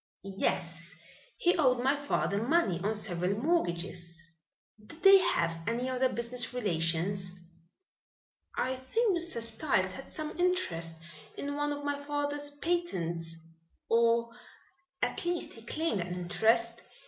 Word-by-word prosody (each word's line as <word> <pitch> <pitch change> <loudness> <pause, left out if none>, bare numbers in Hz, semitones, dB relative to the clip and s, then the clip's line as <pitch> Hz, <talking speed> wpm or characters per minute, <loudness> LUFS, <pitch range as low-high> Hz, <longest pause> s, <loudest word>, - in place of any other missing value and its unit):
"Yes, 170 -3 -2 0.4
he 355 - +3
owed 255 -5 +3
my 270 +2 +4
father 285 -8 0
money 245 - +2
on 215 +2 +1
several 190 -2 -1
mortgages." 175 - -1 0.5
"Did 325 +10 -14
they 390 0 +10
have 170 - +1
any 245 +3 0
other 255 0 +2
business 245 +1 -1
relations?" 180 -2 0 1.2
"I 260 0 0
think 395 - +1
Mr. 340 -7 -1
Styles 225 -5 +1
had 270 +8 -9
some 310 +2 -4
interest 175 - +1 0.4
in 285 0 -3
one 290 0 0
of 290 0 -4
my 285 0 -1
father's 290 0 -1
patents 180 - -2 0.5
or, 230 0 +3 0.7
at - - -1
least 350 0 -1
he 225 - -12
claimed 240 - -1
an 170 - -4
interest. 225 +6 +2
235 Hz, 125 wpm, -31 LUFS, 185-290 Hz, 1.2 s, they